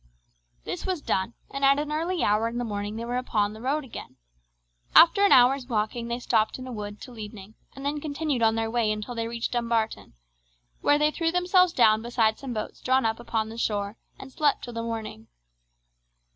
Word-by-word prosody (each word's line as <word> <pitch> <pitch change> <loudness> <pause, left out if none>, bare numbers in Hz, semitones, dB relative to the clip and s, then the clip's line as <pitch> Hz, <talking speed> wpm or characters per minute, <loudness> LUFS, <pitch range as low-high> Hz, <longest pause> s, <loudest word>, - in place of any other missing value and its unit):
This - - -5
was 370 -3 -2
done, 210 -4 -2 0.2
and 275 0 -5
at 275 0 +5
an 295 0 -2
early 335 +3 -1
hour 210 +2 +2
in 235 +1 -4
the 245 - -1
morning 205 -1 -4
they 230 +1 -4
were 245 +1 -2
upon 210 -4 0
the 220 - -11
road 285 +5 0
again. 260 - -10 0.8
After 395 +5 +7
an 405 - +5
hour's 255 +1 +5
walking 230 0 -2
they 235 0 -2
stopped 220 -3 +1
in 255 - -8
a 255 - -7
wood 205 -2 -6
till 245 -3 -11
evening 210 -1 -9 0.2
and 275 0 -8
then 290 +1 -1
continued 295 -3 -2
on 220 0 +3
their 225 0 -1
way 230 -2 +1
until 215 +3 -4
they 230 -1 -3
reached 235 0 -3
Dumbarton, 230 -2 -1 0.7
where 290 - +4
they 300 +1 +2
threw 330 +1 0
themselves 360 0 +3
down 220 -6 +4
beside 225 -2 +1
some 270 -2 -6
boats 215 -2 -5
drawn 260 -1 +2
up 225 +1 0
upon 225 -2 -2
the 225 +1 -8
shore, 205 -2 -1 0.2
and 265 - -11
slept 295 -2 +1
till 240 - -7
the 230 - -3
morning. 220 - -6
235 Hz, 205 wpm, -26 LUFS, 220-275 Hz, 0.8 s, After